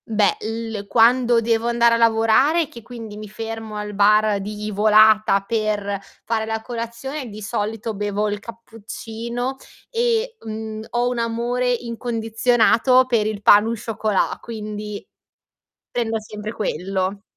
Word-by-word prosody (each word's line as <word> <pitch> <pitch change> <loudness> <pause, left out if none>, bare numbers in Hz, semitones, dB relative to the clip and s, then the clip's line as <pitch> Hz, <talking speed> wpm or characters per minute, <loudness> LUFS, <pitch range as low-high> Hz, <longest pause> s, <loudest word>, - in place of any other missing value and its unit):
Beh, 210 -3 +2
il 225 -2 -4
quando 235 +2 +4
devo 230 0 +1
andare 235 0 +4
a - - +3
lavorare, 230 +8 +3
che 235 - -12
quindi 225 -3 -9
mi 215 -1 -8
fermo 225 0 -6
al 210 0 -5
bar 210 0 +3
di 210 +1 -5
volata 215 -1 +5
per 205 -2 -1 0.3
fare 225 -1 -1
la 220 0 -2
colazione, 245 +4 -5
di 210 0 -9
solito 220 +1 -3
bevo 205 +1 -1
il 205 0 -2
cappuccino 230 +2 -6 0.3
e, 470 0 0
mhmm, 220 0 -5
ho 240 0 +1
un 245 -1 -1
amore 240 +2 0
incondizionato 235 +1 +2
per 230 -4 +1
il 210 -1 -4
pain 205 +1 +7
au 230 +1 -1
chocolat, 215 -3 0
quindi, 210 -2 -7 0.8
prendo 225 -2 -1
sempre 210 0 -7
quello. 195 0 -2
225 Hz, 135 wpm, -21 LUFS, 210-235 Hz, 0.8 s, pain